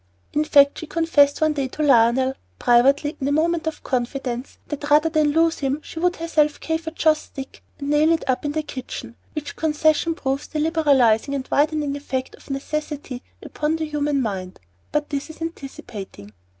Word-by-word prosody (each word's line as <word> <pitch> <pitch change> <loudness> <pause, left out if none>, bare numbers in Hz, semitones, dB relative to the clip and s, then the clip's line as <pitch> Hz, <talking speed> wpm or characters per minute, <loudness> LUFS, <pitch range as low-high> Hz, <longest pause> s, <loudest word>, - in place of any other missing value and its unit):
In 300 - +2
fact, 285 -2 +5
she 320 - -7
confessed 310 -4 +3
one 310 -1 +3
day 275 -3 -1
to 305 +4 -4
Lionel, 260 -1 +4 0.2
privately 275 +5 +3
in 270 - 0
a - - +1
moment 325 +2 +1
of 320 - -4
confidence, 250 0 -3
that 295 0 -4
rather 305 +2 +5
than 310 -2 +2
lose 330 +2 +2
him, 275 +1 -1
she 325 - -8
would 355 +1 +2
herself 305 -3 +1
carve 320 0 -3
a - - -2
joss 310 -1 +2
stick 270 -1 -10 0.2
and 280 +1 -3
nail 300 +2 +4
it 330 - +1
up 255 -1 0
in 290 -1 -2
the 310 0 -1
kitchen; 250 -4 -7 0.2
which 300 -1 -5
concession 315 +1 +2
proves 270 -2 -2
the 310 - -5
liberalizing 280 -6 +3
and 270 -1 -4
widening 295 -1 +1
effect 265 -2 -4
of - - -17
necessity 280 -2 -4 0.2
upon 305 +1 -1
the 320 -1 -2
human 295 -2 0
mind. 190 -4 -4 0.3
But 300 0 -1
this 285 +2 -3
is 315 - -11
anticipating. 235 - -8
295 Hz, 185 wpm, -22 LUFS, 265-315 Hz, 0.3 s, fact